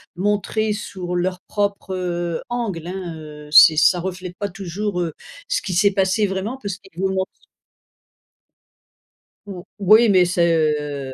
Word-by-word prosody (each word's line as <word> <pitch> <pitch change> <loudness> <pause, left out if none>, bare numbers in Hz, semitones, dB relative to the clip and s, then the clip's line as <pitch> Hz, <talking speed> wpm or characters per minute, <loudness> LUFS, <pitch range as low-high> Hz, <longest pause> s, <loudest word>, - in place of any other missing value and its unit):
montré 210 +3 0
sur 185 -4 -5
leur 180 +1 -1
propre, 200 -2 -2
heu, 175 -2 -3
angle, 215 -9 -3
hein. 180 -3 -5
Heu, 150 -1 -11
c'est 155 +1 +9
ça 170 +3 +4
reflète 180 0 -6
pas 205 -1 -3
toujours, 190 +1 -4
heu, 165 -3 -3 0.3
ce - - -1
qui 185 - -3
s'est 200 +4 +4
passé 195 +2 +1
vraiment. 200 +7 -4
Parce 200 -3 -4
qu'ils 195 -2 -20
vous 190 - +1
montrent 190 0 -2 2.2
Mmh. 185 -3 -7 0.2
Oui, 215 +4 +6
mais 185 -2 +5
c'est, 175 -1 +1
heu, 150 -3 -1
l - - -8
185 Hz, 155 wpm, -21 LUFS, 175-200 Hz, 2.2 s, c'est